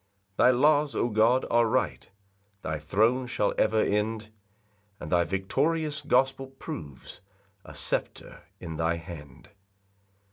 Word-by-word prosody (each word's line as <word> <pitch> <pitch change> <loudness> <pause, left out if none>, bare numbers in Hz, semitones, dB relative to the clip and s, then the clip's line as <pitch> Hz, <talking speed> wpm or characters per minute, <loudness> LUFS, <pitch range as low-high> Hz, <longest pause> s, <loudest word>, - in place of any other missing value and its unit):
4 - - +4
Thy - - +7
laws, 145 +3 +3
O 120 - +1
God, 115 +4 +3
are 120 0 +4
right; - - -1 0.5
Thy 80 -1 -3
throne 110 - +1
shall 105 - 0
ever 110 0 +2
end; 110 +1 -1 0.7
And 75 - -8
thy 85 -1 +4
victorious 150 - -1
gospel 135 -1 +1
proves 80 - -9 0.4
A - - -12
sceptre - - -4 0.2
in 80 -1 -7
thy 80 +1 +1
hand. 80 -4 -11
110 Hz, 130 wpm, -27 LUFS, 85-130 Hz, 0.7 s, Thy